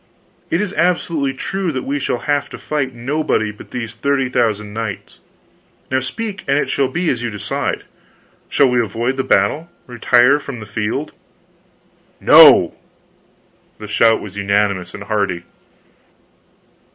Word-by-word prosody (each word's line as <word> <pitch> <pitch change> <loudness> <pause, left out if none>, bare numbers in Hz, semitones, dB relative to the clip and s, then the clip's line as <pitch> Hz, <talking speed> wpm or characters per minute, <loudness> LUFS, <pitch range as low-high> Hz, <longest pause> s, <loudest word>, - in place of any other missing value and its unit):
It 165 - +1
is 205 -2 -3
absolutely 170 -6 0
true 190 +5 -3
that 130 -3 -4
we 145 +1 -2
shall 125 -2 -2
have 145 -1 0
to - - -8
fight 135 -4 -3
nobody 125 -3 -1
but 105 - -14
these 120 -3 -5
thirty 140 -2 0
thousand 105 -4 -1
knights. 110 -3 -6 0.7
Now 130 - +2
speak, 205 - -5
and 140 +1 +2
it - - 0
shall 140 - +1
be 175 +4 -1
as 120 - -3
you 120 - -2
decide. 105 -2 -3 0.7
Shall 140 - +4
we 125 -1 +2
avoid 115 +4 -2
the 130 - -1
battle, 130 - +1 0.2
retire 125 +3 +3
from 135 -4 -8
the 110 - -8
field?" 110 +7 -3 1.1
"NO!!!" - - +7 1.0
The 105 - -9
shout 115 +2 +3
was 100 -1 -9
unanimous 100 -2 0
and 100 - -8
hearty. 100 -4 -1
125 Hz, 145 wpm, -18 LUFS, 105-145 Hz, 1.1 s, NO